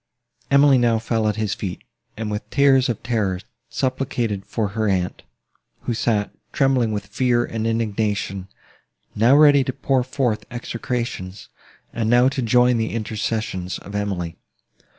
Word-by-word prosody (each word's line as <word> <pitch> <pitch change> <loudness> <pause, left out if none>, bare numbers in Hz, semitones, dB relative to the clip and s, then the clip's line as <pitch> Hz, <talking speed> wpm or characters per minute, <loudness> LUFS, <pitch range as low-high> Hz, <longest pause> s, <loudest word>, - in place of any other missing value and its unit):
Emily 140 -1 +6
now 120 -2 +3
fell 110 -1 0
at 105 - 0
his 110 -2 -1
feet, 90 -3 -5 0.3
and, 110 -1 -3
with 105 +1 -5
tears 135 -2 +4
of 115 - -3
terror, 100 -6 0 0.3
supplicated 125 -6 -2
for 110 -3 -1
her 110 +2 -1
aunt, 90 -2 -1 0.6
who 120 - -2
sat, 110 -2 0 0.2
trembling 130 -4 +2
with 105 -1 -3
fear, 120 +2 +1
and 115 0 -3
indignation; 105 -4 -1 0.7
now 115 +6 +4
ready 145 -2 +6
to 130 - -2
pour 135 0 +1
forth 125 -3 -1
execrations, 120 -5 -4 0.4
and 115 -1 -1
now 120 +2 +5
to 135 -1 -3
join 125 +1 +4
the 110 0 -2
intercessions 110 -4 -3
of 100 - -11
Emily. 95 -5 -3
115 Hz, 145 wpm, -22 LUFS, 105-125 Hz, 0.7 s, Emily